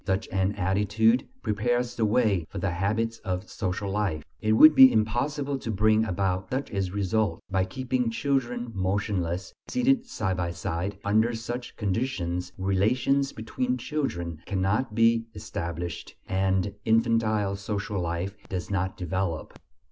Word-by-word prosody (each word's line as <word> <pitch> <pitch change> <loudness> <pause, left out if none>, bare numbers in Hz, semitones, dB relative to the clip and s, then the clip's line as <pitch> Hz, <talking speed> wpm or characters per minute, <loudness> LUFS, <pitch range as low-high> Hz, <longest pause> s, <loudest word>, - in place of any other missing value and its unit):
Such 95 +3 0
an 95 +1 +1
attitude 105 +5 +2 0.2
prepares 120 +3 0
the 115 - +1
way 105 -6 +2
for 100 - -7
the 95 0 -1
habits 110 +6 -1
of 95 0 -3
social 100 0 -3
life. 95 -7 -1 0.2
It 110 0 +2
would 155 +8 +9
be 130 -2 +9
impossible 135 +6 0
to 115 - -6
bring 110 +1 +3
about 95 -1 -1
such 130 +2 -3
a 95 -3 -1
result 105 +2 0
by 95 0 +2
keeping 130 0 -1
children 120 -1 -1
motionless, 95 -2 -1
seated 255 0 +2
side 95 - -2
by 85 -1 -2
side; 90 +4 -3
under 110 +3 +3
such 120 +2 -5
conditions 90 -5 -2
"relations 110 +9 +1
between 125 +3 -2
children" 85 - -3
cannot 105 +4 0
be 115 0 +3
established, 85 -5 -5
and 95 +1 +1
infantile 110 -3 +2
social 100 0 -3
life 85 +3 -3
does 95 +1 -4
not 95 -1 -1
develop. 90 -2 -2
105 Hz, 140 wpm, -27 LUFS, 95-115 Hz, 0.2 s, would